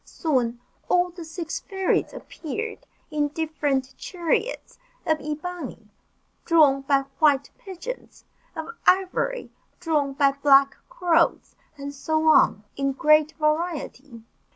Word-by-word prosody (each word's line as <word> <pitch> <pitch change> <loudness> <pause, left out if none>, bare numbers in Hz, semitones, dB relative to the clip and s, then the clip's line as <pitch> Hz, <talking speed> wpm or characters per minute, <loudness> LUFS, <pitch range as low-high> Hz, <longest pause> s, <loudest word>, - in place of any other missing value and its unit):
Soon, 245 -7 -1 0.3
all 360 0 +3
the 345 0 -9
six 325 0 -5
fairies 385 -2 -1
appeared, 430 +8 -6 0.2
in 295 -1 +1
different 290 -4 -2
chariots; 370 +10 -2 0.3
of 315 -1 +1
ebony, 300 -7 -6 0.5
drawn 300 -5 +4
by 275 0 +2 0.2
white 285 -3 +3
pigeons 470 +3 -8 0.3
of 320 -1 -5 0.2
ivory, 385 +6 +1 0.3
drawn 300 -5 0
by 280 0 +3
black 275 0 +4
crows, 345 -9 +1 0.2
and 280 0 -6
so 315 +3 -1
on, 210 -8 +4
in 275 0 -1
great 305 +1 +4
variety. 305 -6 -2
310 Hz, 110 wpm, -24 LUFS, 275-345 Hz, 0.5 s, drawn